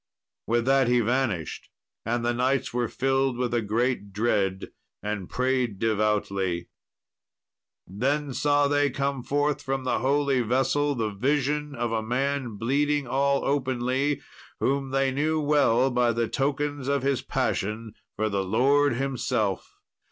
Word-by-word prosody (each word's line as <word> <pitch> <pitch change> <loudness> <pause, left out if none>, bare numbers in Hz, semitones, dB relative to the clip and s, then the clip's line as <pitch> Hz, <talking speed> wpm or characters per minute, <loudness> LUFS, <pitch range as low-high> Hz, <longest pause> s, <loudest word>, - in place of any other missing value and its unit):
With 120 0 +1
that 135 -1 +4
he 125 0 +3
vanished, 120 - -1 0.4
and 120 +1 0
the 120 - +1
knights 130 +1 0
were 120 -1 0
filled 135 0 0
with 125 -1 -1
a 120 - +2
great 110 0 -1
dread 100 -3 0 0.3
and 105 -3 -4
prayed 125 -4 0
devoutly. 100 -5 0 1.2
Then 135 +8 -1
saw 145 +1 +2
they 145 0 +2
come 140 0 -2
forth 145 +3 0
from 135 -1 -2
the 130 - 0
holy 140 -1 +2
vessel 135 +5 +1
the 110 -3 -1
vision 145 +6 0
of 120 -1 -2
a 115 -1 0
man 130 +1 -1
bleeding 145 +5 +1
all 140 +2 +1
openly, 130 +1 0 0.4
whom 135 0 0
they 135 0 +1
knew 155 +4 0
well 140 -4 +3
by 125 -1 +2
the 115 0 0
tokens 145 +1 -2
of 140 -1 0
His 135 -1 +1
passion 110 +2 -2 0.2
for 110 +1 0
the 100 -2 -1
Lord 135 +7 +3
Himself. 120 -6 -1
130 Hz, 140 wpm, -26 LUFS, 115-140 Hz, 1.2 s, that